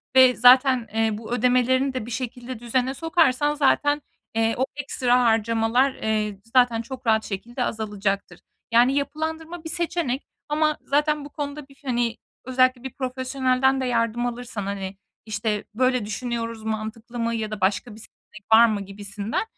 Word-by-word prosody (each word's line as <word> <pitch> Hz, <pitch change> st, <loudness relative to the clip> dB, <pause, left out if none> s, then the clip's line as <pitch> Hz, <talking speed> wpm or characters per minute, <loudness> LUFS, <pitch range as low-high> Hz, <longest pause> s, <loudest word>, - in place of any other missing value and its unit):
ve 260 Hz, -1 st, +7 dB
zaten, 255 Hz, 0 st, +6 dB
eee, 225 Hz, 0 st, +2 dB
bu 220 Hz, +1 st, -9 dB
ödemelerini 255 Hz, +2 st, +2 dB
de 255 Hz, -4 st, -3 dB
bir 240 Hz, -, -8 dB
şekilde 245 Hz, 0 st, -5 dB
düzene 250 Hz, +2 st, 0 dB
sokarsan 295 Hz, -2 st, +2 dB
zaten, 290 Hz, +1 st, +2 dB, 0.3 s
eee, 225 Hz, 0 st, +2 dB
o 260 Hz, -, +2 dB
ekstra 250 Hz, -3 st, +1 dB
harcamalar, 230 Hz, +3 st, +2 dB
eee, 215 Hz, -3 st, -2 dB
zaten 235 Hz, -1 st, +3 dB
çok 255 Hz, +1 st, -9 dB
rahat 220 Hz, -1 st, +3 dB
şekilde 235 Hz, +6 st, -4 dB
azalacaktır. 200 Hz, -5 st, -3 dB, 0.3 s
Yani 245 Hz, +4 st, +5 dB
yapılandırma 320 Hz, +3 st, -3 dB
bir 320 Hz, -, -6 dB
seçenek 325 Hz, -6 st, -1 dB, 0.2 s
ama 305 Hz, 0 st, +1 dB
zaten 295 Hz, +1 st, 0 dB
bu -, -, -9 dB
konuda 290 Hz, -1 st, -6 dB
bir, 275 Hz, +1 st, -21 dB
hani, 240 Hz, -2 st, 0 dB, 0.3 s
özellikle 255 Hz, 0 st, +2 dB
bir 265 Hz, -, -6 dB
profesyonelden 260 Hz, 0 st, 0 dB
de 260 Hz, -, -1 dB
yardım 235 Hz, -1 st, 0 dB
alırsan, 240 Hz, -3 st, -4 dB
hani, 195 Hz, -1 st, -5 dB, 0.3 s
işte, 210 Hz, -1 st, -2 dB
"Böyle 255 Hz, -1 st, +1 dB
düşünüyoruz 230 Hz, +1 st, -4 dB
mantıklı 220 Hz, +2 st, -5 dB
mı?" 230 Hz, 0 st, 0 dB
ya 220 Hz, -1 st, -3 dB
da 210 Hz, -2 st, -5 dB
"Başka 200 Hz, +4 st, 0 dB
bir 220 Hz, -, -13 dB
seçenek 210 Hz, -1 st, -15 dB
var 230 Hz, +1 st, +9 dB
mı?" 215 Hz, -3 st, 0 dB
gibisinden, 200 Hz, +2 st, -4 dB
245 Hz, 155 wpm, -24 LUFS, 220-265 Hz, 0.3 s, var